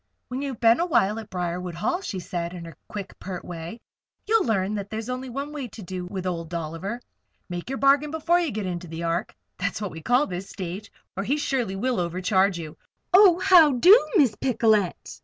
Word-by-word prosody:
"When 255 +2 -3
you've 275 -4 -4
been 230 +2 +5
a 340 - +2
little - - -6
while 215 - +2
at 220 -1 -10
Briarwood 180 -1 -3
Hall," 230 - -1
she 215 - -5
said, 175 -1 -4
in 170 -1 -8
her 165 -2 -10
quick, 205 -2 -7
pert 185 -2 -6
way, 170 +6 -7 0.5
"you'll 440 -1 +3
learn 205 -3 0
that 200 -1 -4
that's 220 0 -4
the 250 - -4
only 255 +1 -6
way 280 +1 -5
to 215 -1 -11
do 180 0 -5
with 185 0 -5
Old 165 -3 -3
Dolliver. 170 +7 -4 0.5
Make 175 +5 -5
your 270 - -2
bargain 280 +2 +4
before 320 +3 +2
you 340 -3 0
get 210 -4 -4
into 175 -1 -4
the 165 +1 -6
Ark 170 +1 -2 0.2
that's 190 +1 -2
what 205 -3 -4
we 160 - -9
call 250 - +3
this 185 +1 -6
stage 190 +3 -6 0.2
or 195 - -2
he 275 +8 0
surely 250 -9 -1
will 245 +3 -1
overcharge 185 +2 +1
you. 155 -2 -8 0.3
Oh! 375 -2 +8
how 335 -6 +6
do, 355 - +8 0.2
Miss 275 - +5
Picolet!" 220 -7 0
205 Hz, 215 wpm, -25 LUFS, 180-265 Hz, 0.5 s, Oh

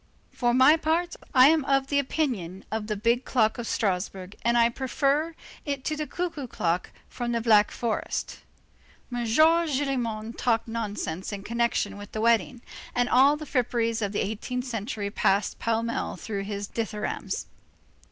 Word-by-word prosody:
For 240 -1 +1
my 260 +6 +6
part, 330 +2 0 0.2
I 260 0 +7
am 315 -2 +3
of 275 -1 +2
the 285 +1 +1
opinion 245 - -2
of 220 -1 -2
the 215 - -1
big 235 +4 +1
clock 220 -2 +1
of 235 - -4
Strasburg, 190 -1 -2
and 235 +1 +2
I 235 0 +6
prefer 280 +6 0 0.3
it 280 -3 -3
to 310 - 0
the 305 0 -3
cuckoo 330 -6 -4
clock 175 -5 -1 0.2
from 240 -1 -3
the 235 - +1
Black 215 -2 +5
Forest." 230 -2 -3 0.7
M. 240 -1 -1
Gillenormand 270 -6 +2
talked 230 -2 +1
nonsense 205 -6 -4
in 200 -1 -6
connection 235 -1 0
with 205 - -10
the 215 - -2
wedding, 235 +1 +2 0.3
and 245 0 +2
all 275 +4 +5
the 305 - -7
fripperies 235 -4 0
of 205 -2 -1
the 205 - -1
eighteenth 245 +5 -4
century 220 -3 -4
passed 200 0 +1
pell 230 0 0
mell 230 0 -2
through 200 -3 -4
his 205 0 -4
dithyrambs. 215 -2 -3
235 Hz, 160 wpm, -26 LUFS, 215-275 Hz, 0.7 s, I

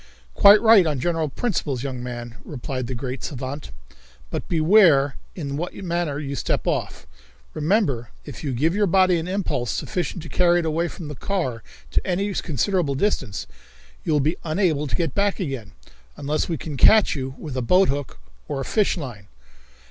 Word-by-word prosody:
"Quite 200 +1 +8
right 220 -6 +7
on 145 -4 -1
general 165 +1 0
principles, 145 - -2
young 130 -3 -4
man," 120 -1 -7
replied 130 -3 -5
the 130 - -4
great 130 +2 -5
savant, 135 +1 -5 0.6
"but - - -4
beware 160 -5 +5 0.2
in 140 -5 -4
what 175 +3 -4
manner 170 -5 -2
you 140 -2 -4
step - - -1
off. - - -2 0.5
Remember, 150 - 0 0.2
if - - -9
you 145 - -2
give 150 +7 +1
your 205 +1 +2
body 185 -1 +4
an 165 - -5
impulse 180 - -1
sufficient 180 -2 -3
to - - -8
carry 175 +1 +3
it 175 - 0
away 165 +2 0
from 170 -1 -8
the 150 - -6
car 135 -8 -2 0.3
to - - +2
any 195 +2 0
considerable 165 - 0
distance, 135 - -1 0.6
you - - -1
will 150 - +3
be 155 +5 0
unable 155 -3 +1
to - - -2
get 165 -6 -1
back 200 +1 +1
again, 135 - -4 0.5
unless 150 +4 -1
we 165 - -1
can 145 0 -6
catch 215 - +6
you 135 -1 -4
with 150 -5 -7
a 130 - -1
boathook 145 - +2 0.3
or - - -3
a 135 - -3
fishline. 135 - -1
155 Hz, 175 wpm, -23 LUFS, 135-180 Hz, 0.6 s, Quite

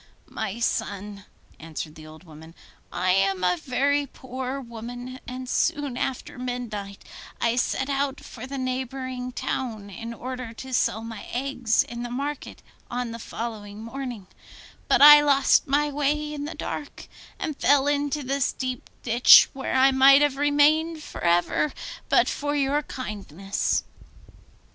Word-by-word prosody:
'My 220 0 -5
son,' 205 -3 -3 0.3
answered 155 -1 -6
the 155 0 -12
old 155 +2 -13
woman, 160 0 -14 0.4
'I 185 +1 +1
am 195 0 +2
a 180 0 +3
very 280 - 0
poor 260 +1 -6
woman, 245 +1 -8
and 255 0 -6
soon 280 0 0
after 255 -1 -4
midnight 225 -6 -5 0.4
I 235 0 +1
set 265 +1 0
out 280 0 -1
for 250 +1 -9
the 275 +1 -5
neighbouring 255 0 -4
town 220 -5 -4
in 230 +4 -7
order 250 0 -6
to 260 +3 -9
sell 225 -2 +1
my 225 -2 -8
eggs 250 -3 +1
in 235 0 -7
the 240 - -4
market 280 +4 -5 0.3
on 245 -1 -3
the 230 - -7
following 215 -2 -6
morning; 245 -4 -6 0.6
but - - +5
I 295 0 +11
lost 280 -2 +4
my 290 +2 +2
way 295 +1 -1
in 290 -1 -4
the 315 - -6
dark, 290 - -6 0.3
and 310 - -3
fell 285 -1 +3
into 290 0 0
this 275 +1 0
deep 255 -1 -5
ditch, 240 +1 +7
where 265 0 -3
I 265 +1 +6
might 275 +2 +7
have 290 -2 +2
remained 300 +3 +3
for - - -9
ever 175 - +2 0.4
but - - +4
for 290 0 -2
your 285 +1 +1
kindness. 200 - -3
255 Hz, 150 wpm, -25 LUFS, 220-275 Hz, 0.6 s, I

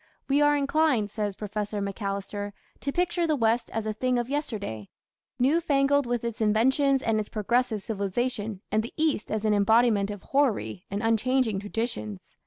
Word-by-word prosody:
"We 280 +2 +3
are 295 0 +4
inclined", 280 -7 +2
says 210 -2 -2
Professor 210 0 -3
Macalister, 200 0 -4 0.3
"to 280 - -2
picture 350 +1 0
the 310 - +2
West 230 -2 +1
as 225 -1 -2
a 215 - -1
thing 250 +3 0
of 240 +2 -2
yesterday, 205 - -3 0.5
new 275 +7 +3
fangled 285 -3 +2
with 240 -1 -1
its 235 -1 -4
inventions 265 +6 +3
and 225 -1 +1
its 210 - -4
progressive 225 0 0
civilization, 210 0 -2
and 215 +1 +3
the 230 - -8
East 310 -8 0
as 215 0 -2
an 215 - +3
embodiment 210 0 +3
of 205 -2 -7
hoary 210 - 0
and 200 +2 -3
unchanging 225 -1 +2
traditions. 205 - -4
225 Hz, 170 wpm, -27 LUFS, 205-265 Hz, 0.5 s, are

